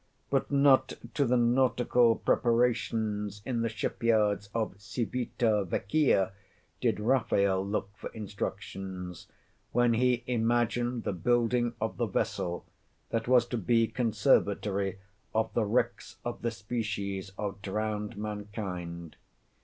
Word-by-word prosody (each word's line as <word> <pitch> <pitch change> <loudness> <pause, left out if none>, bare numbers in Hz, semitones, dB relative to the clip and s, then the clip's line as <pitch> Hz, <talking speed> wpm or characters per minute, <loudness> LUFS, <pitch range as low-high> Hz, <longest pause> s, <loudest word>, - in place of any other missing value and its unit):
But 135 -1 +1
not 140 -2 +4 0.2
to 140 - +2
the 125 0 +3
nautical 120 -1 +3
preparations 110 -4 +1
in 120 -3 -1
the 115 - 0
ship 110 -2 -4
yards 105 -3 +2
of 110 -3 -1
Civita 115 0 0
Vecchia 100 - +2 0.5
did - - +1
Raphael 100 -5 +2
look 100 0 -3
for - - -7
instructions, 95 -3 -6 0.5
when 120 -1 +4
he 125 +1 +2
imagined 120 0 +1
the - - -1
Building 120 +5 +1
of 110 +1 -2
the 120 - 0
Vessel 90 -2 -2 0.5
that 115 0 -1
was 125 -1 +5
to 120 - -1
be 115 +3 +3
conservatory 105 -4 +1 0.4
of 110 0 +1
the 115 - +2
wrecks 110 +5 -1
of 120 - -4
the 120 - 0
species 100 -3 -3
of 100 -2 -4
drowned 105 +2 -3
mankind. 100 -6 -5
110 Hz, 120 wpm, -30 LUFS, 100-120 Hz, 0.5 s, was